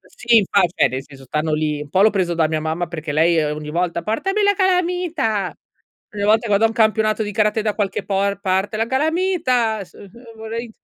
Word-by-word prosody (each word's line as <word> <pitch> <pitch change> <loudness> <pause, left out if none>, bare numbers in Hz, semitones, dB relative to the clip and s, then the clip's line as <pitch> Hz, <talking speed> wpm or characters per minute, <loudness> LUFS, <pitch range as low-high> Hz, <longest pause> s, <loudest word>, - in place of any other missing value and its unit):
Sì, 240 -1 0
infa 200 -1 +2 0.3
nel 130 +1 -4
senso 135 -1 -15
stanno 155 +4 -2
lì, 150 -1 -1
un 145 - -11
po' 185 - +2
l'ho 215 - +6
preso 185 -4 -1
da 160 -2 +1
mia 155 -1 -1
mamma 160 +3 -2
perché 160 -3 -6
lei 160 +1 +3
ogni 150 0 -4
volta: 170 +1 -1
"Portami 390 - -1
la 405 0 +3
calamita!" 355 - 0 0.6
Ogni 205 - -4
volta 220 +3 +3
che 210 - -1
vado 200 +2 +3
a - - +5
un - - -5
campionato 215 -1 +2
di 210 -1 -4
karate 215 +1 +1
da 210 -1 -1
qualche 200 -3 -2
por 200 0 -1
parte 190 +3 -1
"La 225 - 0
calamita!" 265 - 0
s 175 - -23
uhm, 200 - -13 0.3
vorrei, 225 +1 -6
205 Hz, 210 wpm, -20 LUFS, 170-230 Hz, 0.6 s, l'ho